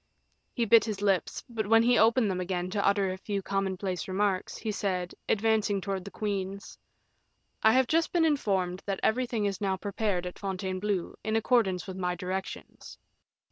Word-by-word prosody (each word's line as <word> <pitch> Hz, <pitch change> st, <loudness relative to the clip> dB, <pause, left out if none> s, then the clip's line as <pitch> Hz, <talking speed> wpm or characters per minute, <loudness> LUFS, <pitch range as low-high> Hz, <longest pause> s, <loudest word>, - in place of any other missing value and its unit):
He 235 Hz, -, +1 dB
bit 230 Hz, +1 st, +6 dB
his 205 Hz, -3 st, -4 dB
lips, 195 Hz, -3 st, 0 dB
but 225 Hz, -4 st, -3 dB
when 225 Hz, +1 st, +5 dB
he 245 Hz, +1 st, +4 dB
opened 225 Hz, -1 st, +4 dB
them 185 Hz, -1 st, -2 dB
again 180 Hz, 0 st, -2 dB
to 200 Hz, 0 st, 0 dB
utter 200 Hz, -1 st, +2 dB
a 185 Hz, -, -6 dB
few 200 Hz, 0 st, -3 dB
commonplace 190 Hz, -2 st, -2 dB
remarks, 190 Hz, 0 st, -1 dB
he 220 Hz, -, -3 dB
said, 185 Hz, -3 st, -2 dB, 0.2 s
advancing 215 Hz, -1 st, +2 dB
towards 195 Hz, -1 st, -4 dB
the -, -, -6 dB
queens: 200 Hz, -1 st, -4 dB, 0.9 s
"I 220 Hz, -, +5 dB
have 260 Hz, 0 st, +4 dB
just 325 Hz, +5 st, +1 dB
been 340 Hz, -2 st, +3 dB
informed 195 Hz, -, 0 dB
that 195 Hz, -2 st, -1 dB
everything 235 Hz, -2 st, +1 dB
is 200 Hz, -1 st, -2 dB
now 190 Hz, -2 st, 0 dB
prepared 200 Hz, -2 st, -2 dB
at 180 Hz, -, -7 dB
Fontainebleau, 190 Hz, -1 st, -2 dB
in 220 Hz, 0 st, -1 dB
accordance 220 Hz, -5 st, +2 dB
with 190 Hz, -1 st, -7 dB
my 180 Hz, -1 st, -1 dB
directions." 185 Hz, +2 st, -6 dB
200 Hz, 175 wpm, -29 LUFS, 185-220 Hz, 0.9 s, bit